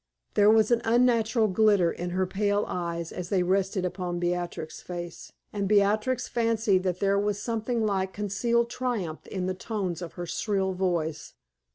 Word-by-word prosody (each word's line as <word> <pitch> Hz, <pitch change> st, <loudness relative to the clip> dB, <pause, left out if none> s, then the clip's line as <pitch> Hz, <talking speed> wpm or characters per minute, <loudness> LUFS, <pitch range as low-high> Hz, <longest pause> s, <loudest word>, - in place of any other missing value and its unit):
There 205 Hz, 0 st, +5 dB
was 220 Hz, +1 st, +4 dB
an 235 Hz, -1 st, +3 dB
unnatural 230 Hz, -1 st, +3 dB
glitter 200 Hz, -3 st, +3 dB
in 175 Hz, +1 st, -4 dB
her 185 Hz, +1 st, 0 dB
pale 205 Hz, +2 st, 0 dB
eyes 170 Hz, -2 st, -3 dB
as 180 Hz, -1 st, -6 dB
they 185 Hz, -3 st, +2 dB
rested 190 Hz, +1 st, +1 dB
upon 180 Hz, -1 st, -3 dB
Beatrix's 175 Hz, -2 st, -3 dB
face; 175 Hz, -1 st, -7 dB, 0.2 s
and 200 Hz, -2 st, -1 dB
Beatrix 210 Hz, +5 st, +2 dB
fancied 225 Hz, -5 st, +2 dB
that 185 Hz, -1 st, -2 dB
there 200 Hz, 0 st, +2 dB
was 205 Hz, 0 st, 0 dB
something 230 Hz, +1 st, -1 dB
like 190 Hz, -2 st, 0 dB
concealed 235 Hz, +4 st, 0 dB
triumph 230 Hz, -12 st, -3 dB
in 185 Hz, -2 st, -3 dB
the 185 Hz, -, -1 dB
tones 185 Hz, -3 st, -3 dB
of 175 Hz, -, -6 dB
her 175 Hz, -, -5 dB
shrill 190 Hz, +1 st, -1 dB
voice. 165 Hz, -6 st, -2 dB
195 Hz, 165 wpm, -27 LUFS, 180-220 Hz, 0.2 s, There